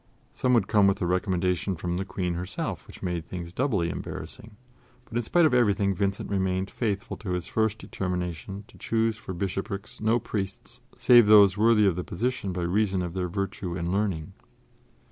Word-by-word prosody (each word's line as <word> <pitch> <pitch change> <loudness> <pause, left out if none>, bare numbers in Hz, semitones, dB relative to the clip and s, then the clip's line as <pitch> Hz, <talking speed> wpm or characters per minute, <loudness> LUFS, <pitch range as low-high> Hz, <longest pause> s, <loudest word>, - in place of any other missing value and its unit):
Some 125 0 +2
would 110 -5 +2
come 105 -2 +4
with 100 +1 +2
a - - +1
recommendation 90 0 0
from 85 +1 -3
the 95 - -2
Queen 90 -2 -2
herself, 90 +1 -4
which - - -12
made 90 -2 -2
things 85 0 -7
doubly 100 -9 0
embarrassing; 105 -1 -8 0.5
but 115 - -11
in 120 - +2
spite 170 +9 +3
of 150 - +3
everything 100 -5 +3
Vincent 100 +1 -1
remained 95 -1 0
faithful 100 -4 -2
to 95 -4 -4
his 90 -1 -2
first 110 -1 0
determination 90 0 -4
to - - -17
choose 115 -1 +1
for 95 -4 -7
bishoprics 100 +3 -4
no 110 +2 +3
priests 110 +2 -5 0.2
save 120 -4 +7
those 100 -3 +7
worthy 110 0 +4
of 95 -4 +3
the 90 - -3
position 110 +1 -2
by 90 -1 -3
reason 95 +1 +1
of 85 -1 -5
their 90 -1 -2
virtue 95 -2 -3
and 85 0 -2
learning. 95 -3 -1
95 Hz, 185 wpm, -27 LUFS, 90-110 Hz, 0.5 s, save